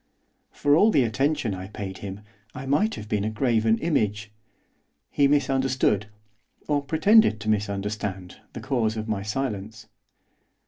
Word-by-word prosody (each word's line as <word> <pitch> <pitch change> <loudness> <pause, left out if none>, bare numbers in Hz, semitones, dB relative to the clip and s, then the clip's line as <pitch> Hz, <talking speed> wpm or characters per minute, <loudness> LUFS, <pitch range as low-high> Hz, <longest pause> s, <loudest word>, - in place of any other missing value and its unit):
For 145 0 +2
all 205 +7 +5
the 140 -11 +3
attention 130 0 0
I 95 0 -6
paid 95 -2 -7
him, 100 0 -7 0.3
I 135 - -6
might 195 +12 +1
have 105 - -8
been 105 -1 -1
a 110 - -1
graven 110 -1 +1
image. 105 -10 -1 0.8
He 140 - +3
misunderstood, 130 -6 +1 0.6
or 145 -1 +1
pretended 165 - +4
to 110 - -3
misunderstand, 100 -2 -3 0.2
the - - -7
cause 115 -5 -1
of 110 0 -4
my 105 -3 -2
silence. 110 -1 -4
110 Hz, 140 wpm, -25 LUFS, 105-140 Hz, 0.8 s, all